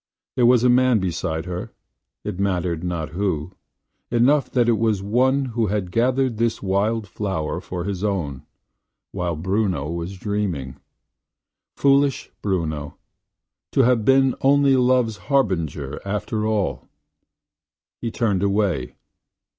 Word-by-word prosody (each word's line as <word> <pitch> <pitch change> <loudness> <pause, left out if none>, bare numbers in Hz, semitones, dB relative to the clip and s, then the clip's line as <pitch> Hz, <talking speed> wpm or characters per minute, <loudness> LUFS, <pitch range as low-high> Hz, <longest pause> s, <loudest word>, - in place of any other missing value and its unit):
There 120 -2 +4
was 125 -1 +5
a - - +5
man 125 -1 +4
beside 80 -4 -2
her 90 0 -5 0.3
– - - -60
it 90 - -5
mattered 90 -4 -1
not 85 -3 -3
who; 90 -2 -2 0.6
enough 130 +5 +3
that 120 -2 +2
it 115 -2 +3
was 110 -4 +1
one 130 +6 +2
who 115 -1 +1
had 100 -3 -2
gathered 125 +2 +1
this 115 0 0
wild 105 +3 0
flower 95 -5 -3
for 90 -1 -5
his 95 0 -4
own, 85 -11 -2 0.7
while 90 -3 -2
Bruno 90 -3 -1
was 85 +3 -5
dreaming. 90 - -3 1.0
Foolish 140 -1 +2
Bruno! 80 -7 -2 0.8
to - - +4
have 125 -3 +3
been 135 +1 +4
only 140 0 +4
love's 125 -3 +2
harbinger 90 - -1
after 105 +2 -2
all! 105 -3 -1 1.1
He 115 - -2
turned 105 -5 0
away. 100 - 0
100 Hz, 130 wpm, -22 LUFS, 90-120 Hz, 1.1 s, was